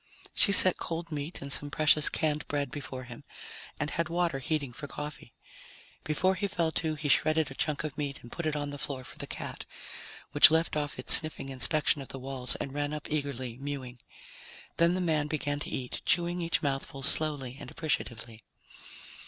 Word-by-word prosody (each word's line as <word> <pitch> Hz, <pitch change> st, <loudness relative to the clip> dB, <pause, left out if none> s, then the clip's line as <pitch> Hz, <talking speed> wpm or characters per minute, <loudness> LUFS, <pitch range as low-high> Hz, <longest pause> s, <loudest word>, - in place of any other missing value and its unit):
She 200 Hz, -, +4 dB
set 185 Hz, -2 st, +8 dB
cold 165 Hz, 0 st, -5 dB
meat 150 Hz, +1 st, -5 dB
and 140 Hz, 0 st, +2 dB
some 145 Hz, -, +4 dB
precious 155 Hz, 0 st, +4 dB
canned 150 Hz, -1 st, -1 dB
bread 145 Hz, -3 st, -2 dB
before 130 Hz, -3 st, -6 dB
him 120 Hz, -1 st, -11 dB, 0.6 s
and 150 Hz, 0 st, -2 dB
had 170 Hz, -1 st, -1 dB
water 170 Hz, -4 st, 0 dB
heating 140 Hz, -2 st, -2 dB
for 145 Hz, +4 st, -7 dB
coffee. 150 Hz, -4 st, -8 dB, 0.7 s
Before 185 Hz, +5 st, +1 dB
he 200 Hz, +1 st, -2 dB
fell 170 Hz, -4 st, -1 dB
to, 160 Hz, -1 st, -1 dB
he 150 Hz, 0 st, -3 dB
shredded 155 Hz, +1 st, +3 dB
a -, -, -6 dB
chunk 150 Hz, +1 st, 0 dB
of 155 Hz, -1 st, -6 dB
meat 140 Hz, -2 st, -3 dB
and 120 Hz, -, -12 dB
put 170 Hz, -, -4 dB
it 155 Hz, -, -1 dB
on 145 Hz, -1 st, -3 dB
the 145 Hz, -, -8 dB
floor 135 Hz, -2 st, -3 dB
for -, -, -12 dB
the -, -, -4 dB
cat, -, -, -6 dB, 0.7 s
which -, -, +9 dB
left 160 Hz, +1 st, +1 dB
off 145 Hz, -1 st, -2 dB
its -, -, +1 dB
sniffing 155 Hz, -3 st, +5 dB
inspection 140 Hz, +3 st, +1 dB
of 135 Hz, -, -8 dB
the 135 Hz, -, -5 dB
walls 130 Hz, -1 st, -2 dB
and 135 Hz, -, -5 dB
ran 145 Hz, 0 st, -2 dB
up 150 Hz, -, -8 dB
eagerly 130 Hz, -5 st, -3 dB
mewing. 135 Hz, -3 st, -6 dB, 0.8 s
Then 170 Hz, +1 st, +3 dB
the 185 Hz, -, -1 dB
man 155 Hz, -4 st, 0 dB
began 145 Hz, -1 st, -2 dB
to -, -, -5 dB
eat, 125 Hz, -1 st, -4 dB
chewing 175 Hz, +1 st, +1 dB
each 165 Hz, -1 st, 0 dB
mouthful 135 Hz, -1 st, -3 dB
slowly 140 Hz, -3 st, +1 dB
and 140 Hz, -4 st, -9 dB
appreciatively. 115 Hz, -8 st, -3 dB
145 Hz, 195 wpm, -29 LUFS, 135-155 Hz, 0.8 s, which